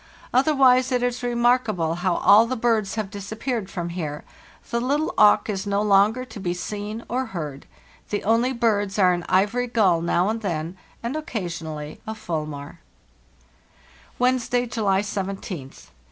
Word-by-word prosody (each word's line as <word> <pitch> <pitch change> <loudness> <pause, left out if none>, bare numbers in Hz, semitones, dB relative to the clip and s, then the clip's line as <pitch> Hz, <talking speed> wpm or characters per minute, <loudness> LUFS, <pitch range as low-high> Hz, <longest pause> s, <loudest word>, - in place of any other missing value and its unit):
Otherwise 260 -1 +4
it 250 -1 +1
is 245 0 -1
remarkable 235 -8 +1
how 175 +1 0
all 215 +3 +6
the 255 - -2
birds 225 -4 0
have 215 -3 -3
disappeared 215 +2 -4
from 175 -3 -4
here. 155 -4 -5 0.5
The 235 0 0
little 285 +5 0
auk 210 0 +5
is 200 -2 -3
no 200 +1 +1
longer 210 +5 +3
to 245 - -10
be 180 -2 -2
seen 210 +4 -5
or 255 +2 -2
heard; 150 -9 -6 0.4
the 205 - -2
only 230 +4 +2
birds 215 -5 0
are 185 -3 +5
an 175 0 -3
ivory 210 +7 +2
gull 195 -8 +3
now 175 +2 +1
and 225 +1 -2
then, 170 -3 -3 0.3
and 235 +5 -3
occasionally 165 - -5
a 220 - -4
fulmar. 155 -8 -5 1.4
"Wednesday, 250 -1 +1
July 205 -5 +1
17th. 195 -8 -6
210 Hz, 150 wpm, -23 LUFS, 180-240 Hz, 1.4 s, all